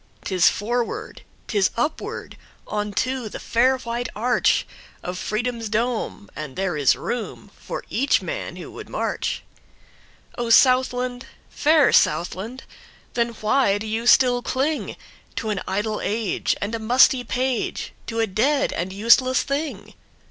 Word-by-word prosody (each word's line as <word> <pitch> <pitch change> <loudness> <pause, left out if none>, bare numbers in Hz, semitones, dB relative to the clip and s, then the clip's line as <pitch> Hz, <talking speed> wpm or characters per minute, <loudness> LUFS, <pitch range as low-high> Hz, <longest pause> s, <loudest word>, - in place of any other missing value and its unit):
'Tis 185 -3 +4
forward, 240 - -3 0.3
'tis 200 -4 +2
upward, 295 +7 -3 0.3
On 210 0 -3
to 255 +2 -1
the - - -7
fair 255 +3 +2
white 240 -1 -4
archOf 240 +3 +2 0.5
Freedom's 230 +3 -2
dome, 225 -2 -2
and 150 -4 -6
there 190 -3 -1
is 145 -3 +4
roomFor 240 -2 -5
each 275 +5 +2
man - - -5
who - - -9
would - - -10
march.O 240 -1 -6
Southland, 255 0 +3 0.2
fair 305 -2 +4
Southland! 190 +10 +1 0.5
Then 235 -1 +1
why 215 -2 +3
do 210 - -6
you 225 +2 -2
still 245 0 +5
clingTo 285 +5 -1 0.5
an 200 - -2
idle 210 +3 -1
age 215 -2 0
and 205 +3 -3
a 230 - -2
musty 245 +3 +4
page, 255 0 -2
To 230 -1 -3
a 225 - +3
dead 260 +9 +1
and 180 +2 -3
useless 235 +6 +4
thing? 290 +2 -4
235 Hz, 125 wpm, -23 LUFS, 210-255 Hz, 0.5 s, still